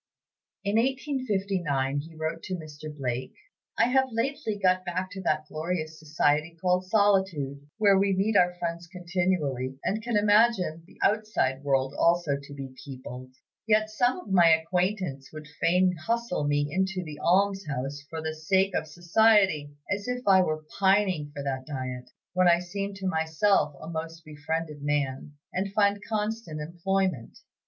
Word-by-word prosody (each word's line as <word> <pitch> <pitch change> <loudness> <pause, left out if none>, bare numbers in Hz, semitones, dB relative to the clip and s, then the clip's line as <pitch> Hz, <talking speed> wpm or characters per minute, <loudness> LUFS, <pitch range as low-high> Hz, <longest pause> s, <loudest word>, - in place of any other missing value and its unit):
In 200 +1 +1
1859 200 - 0
he 160 +3 -9
wrote 160 +1 -3
to 185 - -3
Mr. 155 -3 -10
Blake: 130 -3 -4 0.4
"I - - +5
have 265 +1 +3
lately 230 -1 -2
got 185 -2 +2
back 185 +1 -3
to 190 - -6
that 155 -4 0
glorious 155 0 -4
society 155 +1 0
called 180 +1 +1
Solitude, 185 -9 +1
where 200 -3 +5
we 195 -1 +2
meet 205 +3 +1
our 180 -2 +4
friends 170 -1 -4
continually, 175 -8 -1
and 215 +3 -1
can 235 -1 0
imagine 205 -6 +3
the - - -19
outside 205 -11 +1
world 135 -1 +1
also 170 -4 +3
to 140 0 -9
be 135 -2 -7
peopled. 130 -1 -9 0.3
Yet 215 0 +3
some 245 +6 +2
of 210 - -10
my 175 -3 +6
acquaintance 165 -3 0
would 155 -1 -9
fain 180 +2 +3
hustle 225 -1 -1
me 145 0 +1
into 190 +1 -1
the 150 -3 -8
almshouse 170 -7 0
for 160 -1 -5
the 160 0 -2
sake 190 +5 +1
of 160 - -1
society; 175 -2 +3 0.2
as 200 +3 -4
if 250 -1 -3
I 190 -1 +7
were 155 -3 -2
pining 190 -6 +2
for 140 -1 -6
that 130 -1 -3
diet, 130 -3 -5 0.2
when 185 0 +4
I 170 0 +6
seem 195 +3 -4
to 195 0 -7
myself 160 -1 +2
a - - -9
most 165 0 -6
befriended 155 0 -4
man, 145 -1 -1 0.2
and 190 +2 -2
find 200 0 +2
constant 215 -6 -2
employment. 175 -3 -2
175 Hz, 155 wpm, -27 LUFS, 150-200 Hz, 0.4 s, I